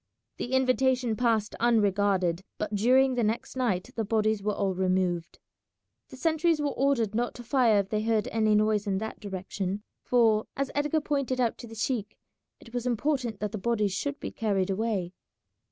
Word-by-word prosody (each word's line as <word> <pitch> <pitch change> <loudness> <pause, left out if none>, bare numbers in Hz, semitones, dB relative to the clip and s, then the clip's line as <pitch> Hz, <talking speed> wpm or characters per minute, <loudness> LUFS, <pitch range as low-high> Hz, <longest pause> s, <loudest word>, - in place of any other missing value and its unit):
The 245 - -4
invitation 255 -2 +2
passed 225 -3 +1
unregarded, 200 -6 +2
but 210 0 -3
during 255 +6 +4
the 245 -2 0
next 220 +4 -2
night 240 -4 -1
the 225 - -1
bodies 215 0 +1
were 210 0 -1
all 195 -1 0
removed. 185 -2 0 0.7
The 260 - -11
sentries 320 +3 +2
were 290 -1 0
ordered 260 -7 +1
not 240 +2 -1
to 240 - -9
fire 235 -3 +3
if 195 - -10
they 215 0 0
heard 220 -1 +1
any 215 -1 +2
noise 210 -1 +2
in 195 -1 +1
that 220 +2 -5
direction, 195 0 -4 0.2
for, 225 -3 +3
as 275 -1 -1
Edgar 295 +2 +1
pointed 275 -3 -1
out 235 -3 +1
to 240 - -8
the 225 - -10
sheik, 220 -2 -2 0.4
it 230 - -16
was 245 0 -2
important 245 -3 -1
that 210 -1 -2
the 215 - -4
bodies 210 -2 0
should 285 +9 -3
be - - -5
carried 200 -4 0
away. 195 -3 -1
220 Hz, 180 wpm, -28 LUFS, 205-255 Hz, 0.7 s, during